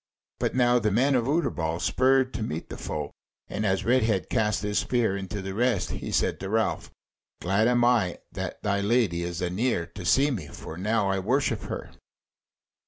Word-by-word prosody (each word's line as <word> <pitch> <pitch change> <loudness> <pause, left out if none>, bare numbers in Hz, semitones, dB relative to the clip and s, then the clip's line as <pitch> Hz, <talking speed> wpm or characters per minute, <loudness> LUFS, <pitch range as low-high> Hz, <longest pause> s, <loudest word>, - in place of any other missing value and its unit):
But - - -1
now 125 -1 +4
the 105 -2 +1
men 130 +7 +3
of 120 -3 +2
Utterbol 85 - 0
spurred 130 +6 +2
to - - -4
meet 80 -6 -4
the - - -7
foe, 75 -2 -4 0.4
and 105 - -3
as 95 0 0
Redhead 110 -8 +2
cast 105 -3 +1
his 105 0 +1
spear 120 -6 +1
into 100 +1 -5
the 95 0 -4
rest, 115 -1 +1
he - - -5
said - - +1
to 95 - -5
Ralph: 110 +1 0 0.5
"Glad 100 +5 +2
am 120 -1 +3
I 115 -8 +2
that - - -6
thy 100 -1 +1
Lady 105 -5 +2
is 85 0 -3
anear 90 +1 0
to 100 - -10
see 135 +12 +3
me, 95 - -4
for 80 - -9
now 105 +3 0
I 95 - 0
worship 125 +9 0
her." - - -6
105 Hz, 185 wpm, -26 LUFS, 95-120 Hz, 0.5 s, now